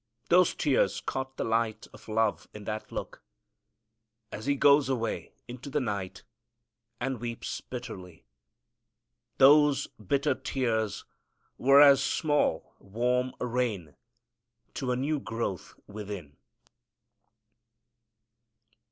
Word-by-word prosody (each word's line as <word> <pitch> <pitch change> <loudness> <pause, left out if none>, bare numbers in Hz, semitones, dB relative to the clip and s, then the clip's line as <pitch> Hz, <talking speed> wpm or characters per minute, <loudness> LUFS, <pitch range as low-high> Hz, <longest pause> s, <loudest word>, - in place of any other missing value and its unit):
Those 180 0 +5
tears 145 -3 +1
caught 130 0 -5
the - - -1
light 115 -1 -1
of - - -15
love 110 -1 0
in 105 - -8
that 110 +1 -5
look, - - -6 1.1
as 110 +5 -7
he 140 - +2
goes 140 0 +5
away 115 -4 -3
into 125 +3 -8
the 150 +2 0
night 100 -7 -4 0.8
and 130 -1 -2
weeps 120 -1 -5
bitterly. 95 - -9 1.1
Those 145 +1 +6 0.2
bitter 140 +8 +1
tears 115 -6 -2 0.5
were 140 +3 +7
as 140 -2 +7
small, 145 - 0
warm 125 +5 -1
rain 115 - -2 0.8
to 130 -4 -2
a - - +1
new 145 +4 -1
growth 115 -7 -4
within. 100 -8 -8
125 Hz, 105 wpm, -28 LUFS, 110-135 Hz, 1.1 s, were